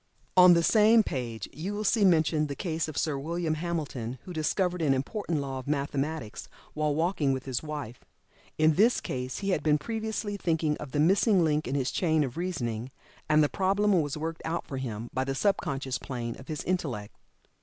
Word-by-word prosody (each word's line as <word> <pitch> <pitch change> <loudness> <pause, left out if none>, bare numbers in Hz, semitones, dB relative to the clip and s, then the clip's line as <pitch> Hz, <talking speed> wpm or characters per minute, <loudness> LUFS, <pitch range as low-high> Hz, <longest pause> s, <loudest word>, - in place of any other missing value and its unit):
On 180 -1 +8
the 170 - +3
same 220 +3 +5
page 120 - -4
you 180 +9 -4
will 210 - -3
see 215 0 +2
mentioned 160 -4 +3
the 140 - -5
case 160 -1 -2
of 155 - -7
Sir 150 -3 0
William 165 +2 -2
Hamilton, 150 -7 -3
who 180 - -8
discovered 180 +3 0
an 140 -4 +3
important 165 - -2
law 135 -1 -4
of 130 - -10
mathematics 145 -3 -3 0.2
while 150 -1 0
walking 160 -4 +1
with 130 -1 -4
his 130 -3 -2
wife. 150 -6 -6 0.5
In 155 0 +4
this 220 +9 +4
case 130 0 -4
he - - 0
had - - +1
been 150 -1 +3
previously 220 +3 -3
thinking 160 -5 0
of 150 -3 -8
the 145 - -1
missing 190 +4 +4
link 155 -1 +1
in 135 - -2
his 130 -2 0
chain 160 -4 +2
of 130 -3 -4
reasoning, 130 -10 -3 0.4
and 155 0 +5
the - - +4
problem 200 +4 +1
was 145 0 -3
worked 160 +1 -4
out 165 +1 -2
for 135 - -6
him 120 -3 -5
by 130 - 0
the 135 0 -3
sub 200 +6 +2
conscious 135 -5 -3
plane 120 -3 -5
of 130 - -12
his 155 -2 -4
Intellect. 135 - -3
155 Hz, 200 wpm, -28 LUFS, 135-175 Hz, 0.5 s, On